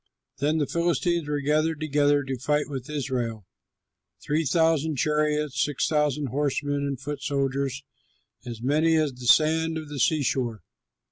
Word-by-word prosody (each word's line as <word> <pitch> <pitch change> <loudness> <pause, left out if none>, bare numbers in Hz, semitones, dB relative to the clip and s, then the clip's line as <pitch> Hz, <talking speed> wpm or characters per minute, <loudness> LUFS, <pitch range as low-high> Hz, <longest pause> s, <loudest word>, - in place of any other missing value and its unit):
Then 150 +3 +1
the 150 - +1
Philistines 170 0 0
were 145 -1 -1
gathered 155 +2 +1
together 145 -1 +2
to 135 -2 -4
fight 150 +3 0
with 135 -2 -6
Israel: 125 -8 -3 0.7
three 155 +2 -1
thousand 160 +1 +2
chariots, 150 0 0
six 145 -3 -1
thousand 150 -2 0
horsemen, 145 +1 -1
and 140 -3 -4
foot 140 +1 -5
soldiers 135 -1 -1 0.6
as 120 -2 -8
many 155 +5 +3
as 155 -3 +1
the 125 0 -8
sand 160 +3 +4
of 155 -2 -7
the 145 -2 -6
seashore. 130 -6 0
145 Hz, 145 wpm, -26 LUFS, 135-155 Hz, 0.7 s, sand